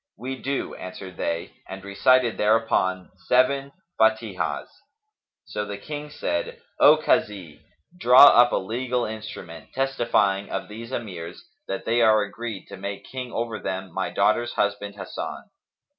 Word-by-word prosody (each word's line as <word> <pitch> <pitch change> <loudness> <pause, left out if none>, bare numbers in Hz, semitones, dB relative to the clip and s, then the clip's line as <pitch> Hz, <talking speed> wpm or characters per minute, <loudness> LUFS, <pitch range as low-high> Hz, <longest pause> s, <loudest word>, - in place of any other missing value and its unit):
"We 130 +4 -6
do," 140 +1 -2
answered 95 0 -9
they 85 0 -3
and 95 0 -8
recited 115 +5 +3
thereupon 105 -4 +1 0.2
seven 135 +2 +3 0.3
Fαtihahs.[FN#275] 110 -3 +1 0.8
So 105 - -4
the 100 -1 -6
King 150 +7 -7
said, 85 -11 -3 0.2
"O - - +8
Kazi, 90 -8 -1 0.3
draw 130 -3 +8
up 120 0 +6
a - - +1
legal 120 +4 -2
instrument 105 -6 -8
testifying 120 -7 +1
of - - -4
these 115 +3 -9
Emirs 90 -9 -6 0.2
that 95 - -4
they 120 +1 +2
are 110 -2 +5
agreed 110 0 -6
to - - -9
make 100 +1 -6
King 125 -2 -5
over 115 -1 -3
them 95 -2 -5
my - - -2
daughter's 120 0 +1
husband 100 0 -1
Hasan." 95 -2 -7
110 Hz, 140 wpm, -24 LUFS, 95-120 Hz, 0.8 s, O